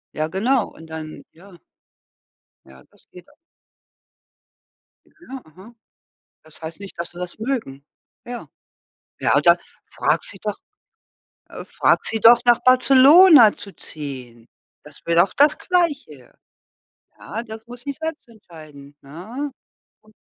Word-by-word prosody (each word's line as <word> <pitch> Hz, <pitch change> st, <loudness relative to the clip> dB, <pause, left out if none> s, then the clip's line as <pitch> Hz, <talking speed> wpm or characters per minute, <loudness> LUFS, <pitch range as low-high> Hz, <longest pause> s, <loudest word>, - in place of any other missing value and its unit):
Ja 155 Hz, 0 st, -2 dB
genau. 225 Hz, +7 st, 0 dB
Und 160 Hz, 0 st, -16 dB
dann 155 Hz, -1 st, -9 dB
ja. 185 Hz, +4 st, -18 dB, 1.1 s
Ja, 65 Hz, 0 st, -18 dB
das -, -, -27 dB
geht 180 Hz, 0 st, -16 dB
a -, -, -24 dB, 1.7 s
Ja, 265 Hz, -6 st, -12 dB
aha. 190 Hz, +9 st, -17 dB, 0.7 s
Das 155 Hz, +1 st, -19 dB
heißt 160 Hz, +3 st, -8 dB
nicht, 200 Hz, -1 st, -12 dB
dass 170 Hz, -, -5 dB
sie 175 Hz, -, -13 dB
das 180 Hz, +2 st, -7 dB
mögen. 220 Hz, -, -4 dB, 0.4 s
Ja. 245 Hz, 0 st, -8 dB, 0.7 s
Ja, -, -, +1 dB
oder -, -, +4 dB, 0.3 s
fragt -, -, -1 dB
sie -, -, -7 dB
doch -, -, -4 dB, 0.9 s
äh, -, -, -10 dB
frag -, -, 0 dB
sie 225 Hz, -, +1 dB
doch, 235 Hz, +1 st, +7 dB
nach 240 Hz, -1 st, +4 dB
Barcelona 265 Hz, -, +6 dB
zu 200 Hz, -, -12 dB
ziehen. 125 Hz, -6 st, -9 dB, 0.4 s
Das 150 Hz, -1 st, -15 dB
wäre 170 Hz, 0 st, +2 dB
doch 195 Hz, -, -12 dB
das 295 Hz, +1 st, +3 dB
Gleiche. 290 Hz, -, -2 dB, 0.9 s
Ja, 225 Hz, +2 st, -7 dB
das 220 Hz, 0 st, -11 dB
muss 245 Hz, 0 st, -12 dB
sie 280 Hz, -, -5 dB
selbst 320 Hz, -2 st, -7 dB
entscheiden, 155 Hz, -9 st, -16 dB
ne? 220 Hz, -, -8 dB, 0.5 s
Und 215 Hz, 0 st, -24 dB
210 Hz, 135 wpm, -20 LUFS, 155-255 Hz, 1.7 s, doch